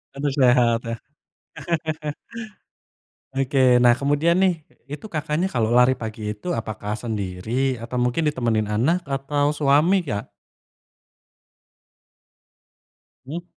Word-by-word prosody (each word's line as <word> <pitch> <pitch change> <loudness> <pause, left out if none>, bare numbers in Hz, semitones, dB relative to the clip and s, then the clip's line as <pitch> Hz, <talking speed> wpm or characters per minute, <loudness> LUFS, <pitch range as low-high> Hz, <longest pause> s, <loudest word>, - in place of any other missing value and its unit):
Aduh, 145 +1 -1
sehat 120 -3 +3
ya? 115 - -3 2.4
Oke, 130 -2 +3
nah, 120 0 +5
kemudian 145 +5 +2
nih, 185 -4 +2 0.2
itu, 150 +10 -8
Kakaknya, 155 +4 -1
kalau 115 - 0
lari 125 +1 +5
pagi 110 -2 -5
itu, 175 +11 -4
apakah 110 -2 -4
sendiri? 110 +4 -2
Atau 120 +2 -5
mungkin 125 +6 +1
ditemenin 115 -6 -1
anak, 140 +13 +1
atau 145 +1 0
suami, 150 +5 +3
Kak? 105 -1 -4 3.0
Mmm. 165 +5 -6
130 Hz, 100 wpm, -23 LUFS, 115-150 Hz, 3.0 s, nah